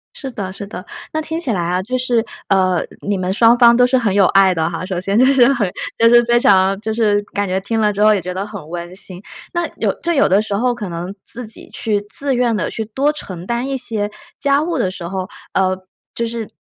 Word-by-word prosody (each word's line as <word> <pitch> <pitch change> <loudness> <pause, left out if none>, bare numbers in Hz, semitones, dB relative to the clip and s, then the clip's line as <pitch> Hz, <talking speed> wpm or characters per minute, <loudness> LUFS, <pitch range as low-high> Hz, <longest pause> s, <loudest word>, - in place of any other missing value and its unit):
是 270 - -6
的 200 -5 -5
是 200 +1 -8
的。 190 -2 -8 0.3
那 315 - 0
听 320 +1 -4
起 285 -8 -2
来 190 -5 0
啊， 175 +2 0
就 250 +7 -2
是 245 -2 +1 0.3
呃， 185 -3 +2 0.2
你 200 0 -1
们 185 0 -1
双 230 +4 +5
方 235 -1 +7
都 245 +1 +5
是 260 +1 +3
很 225 -6 +1
有 200 -1 +5
爱 195 0 +5
的 160 -2 0
哈， 170 +1 -5
首 185 -2 -3
先 195 +3 -1
就 255 - +6
是 270 -1 +5
很 215 -8 0 0.3
就 230 - +5
是 240 0 +7
非 240 0 +3
常 195 -3 +4
就 220 0 -2
是 210 -2 +2
感 205 0 -1
觉 185 +1 0
听 225 +3 -2
了 210 -1 +2
之 205 - -2
后 215 0 +6
也 200 - 0
觉 180 +1 -5
得 190 +2 -3
很 205 -7 -9
温 175 +1 -6
馨。 185 -1 -7 0.3
那 345 -1 0
有 - - +1
就 340 - 0
有 280 - +4
的 195 +3 +4
时 210 -2 -3
候 245 +4 +1
可 210 -5 -5
能 175 +2 -5
自 245 +1 -4
己 220 - -9
去 210 -2 0
自 275 +2 -1
愿 240 -2 +2
地 185 - -1
去 220 - -4
多 265 +7 0
承 185 - -8
担 235 +4 -2
一 275 0 -2
些 220 -5 -2 0.3
家 280 0 +3
务 330 +1 -2
的 185 - 0
时 175 -2 -6
候， 185 0 -4 0.2
呃， 185 -1 +1 0.4
就 235 - -2
是， 230 -2 -5
210 Hz, 270 characters per minute, -18 LUFS, 190-240 Hz, 0.4 s, 方